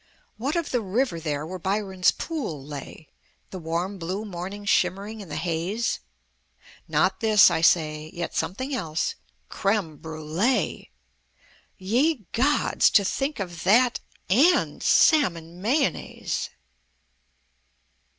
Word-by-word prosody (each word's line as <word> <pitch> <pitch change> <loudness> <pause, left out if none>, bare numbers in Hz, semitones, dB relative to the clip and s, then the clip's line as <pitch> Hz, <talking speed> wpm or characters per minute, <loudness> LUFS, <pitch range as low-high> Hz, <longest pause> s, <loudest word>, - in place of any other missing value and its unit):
What 275 +8 -2
of 335 -3 -1
the 245 - +1
river 210 -1 -1
there 150 -2 -3
where 185 +3 -6
Byron's 190 0 +1
Pool 210 - -5
lay, 145 +1 -9 0.4
The 185 - -6
warm 175 +4 -3
blue 185 +6 -4
morning 195 +1 -6
shimmering 200 +3 0
in 190 - -10
the - - -5
haze?" 175 +7 -1 0.9
Not - - +1
this 215 -3 +6
(I - - 0
say)... 155 -2 +2
Yet 170 0 -5
something 260 +10 -2
else... 165 -10 -1 0.3
Creme 195 - -1
Brûlée! 160 +10 -1 0.9
Ye 240 - +1
gods! 280 +6 +3
to 200 - +4
think 275 +7 -2
of 175 -3 -5
that 240 +4 +4 0.3
and 295 - +3
Salmon 175 - +3
Mayonnaise! 235 - -1
190 Hz, 115 wpm, -25 LUFS, 165-230 Hz, 0.9 s, this